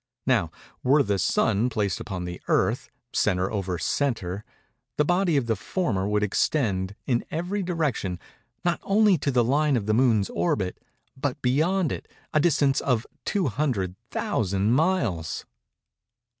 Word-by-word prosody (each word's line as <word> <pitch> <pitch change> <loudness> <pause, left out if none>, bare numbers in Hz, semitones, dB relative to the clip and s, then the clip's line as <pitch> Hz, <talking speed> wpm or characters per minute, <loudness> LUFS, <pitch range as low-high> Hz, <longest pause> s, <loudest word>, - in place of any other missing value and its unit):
Now, 115 -11 +2 0.3
were 140 +3 +4
the 100 -1 0
Sun 105 +7 +2
placed 100 -7 -1
upon 90 -4 -5
the 90 0 -6
Earth, - - +1 0.2
centre 90 0 +1
over 95 -4 -2
centre, 105 - -1 0.5
the 150 - +3
body 175 -1 +2
of 135 - +1
the 115 -1 +1
former 105 - -1
would 105 0 +1
extend, 100 -3 0
in 120 -3 +1
every 180 +6 -2
direction, 155 - -1 0.5
not 175 -1 +1
only 200 -3 +4
to 140 - -1
the 125 -3 +3
line 140 +3 +2
of 105 - -2
the 110 - +1
Moon's 110 -4 +3
orbit, 90 +2 -1 0.4
but 135 -1 -2
beyond 160 +7 +2
it, - - -5 0.3
a 155 - +4
distance 145 -4 +3
of 125 -4 +1 0.2
200,000 110 - -1
miles. 140 - 0
120 Hz, 140 wpm, -26 LUFS, 100-150 Hz, 0.5 s, were